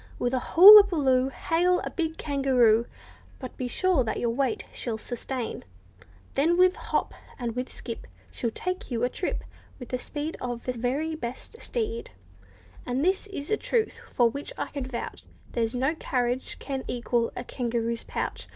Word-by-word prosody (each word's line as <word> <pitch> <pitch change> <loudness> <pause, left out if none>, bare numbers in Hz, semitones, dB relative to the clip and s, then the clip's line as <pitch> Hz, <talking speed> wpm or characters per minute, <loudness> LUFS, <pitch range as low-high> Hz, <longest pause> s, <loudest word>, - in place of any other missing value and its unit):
With 245 +1 -1
a 255 - +2
hulla 400 +10 +10
buloo, 270 -9 +2
Hail 350 +6 +1
a - - -5
big 320 -2 -2
kangaroo— 255 -6 +3 0.5
But 255 -2 -8
be 255 - -3
sure 360 +1 +2
that 220 - -2
your 235 - 0
weight 275 - 0
she'll 230 -3 -3
sustain— 245 +1 -5 0.7
Then 330 +5 +2
with 365 0 +5
hop, - - -2 0.2
and 235 -3 -3
with 250 +1 -3
skip, 230 -2 -7 0.2
She 240 - -3
will - - -1
take 365 +1 -3
you 240 -2 -2
a 245 - +3
trip 360 - -3 0.3
With 250 - -10
the 255 - -2
speed 295 +5 -5
of 245 -1 -4
the 255 - -1
very 265 +7 -1
best 285 - -7
steed; 460 -1 -3 0.7
And, 255 +5 -1
this 380 +3 +1
is 305 -6 -6
a 430 - +3
truth 450 0 -1
for 240 -3 +3
which 280 +5 -5
I - - -3
can 280 -3 -4
vouch, 245 -2 -6 0.3
There's 230 0 -1
no 265 +5 +1
carriage 250 -5 -2
can 270 -2 -4
equal 240 -1 0
a 245 - -3
kangaroo's 235 -2 -2
pouch. - - -4
260 Hz, 175 wpm, -27 LUFS, 240-325 Hz, 0.7 s, hulla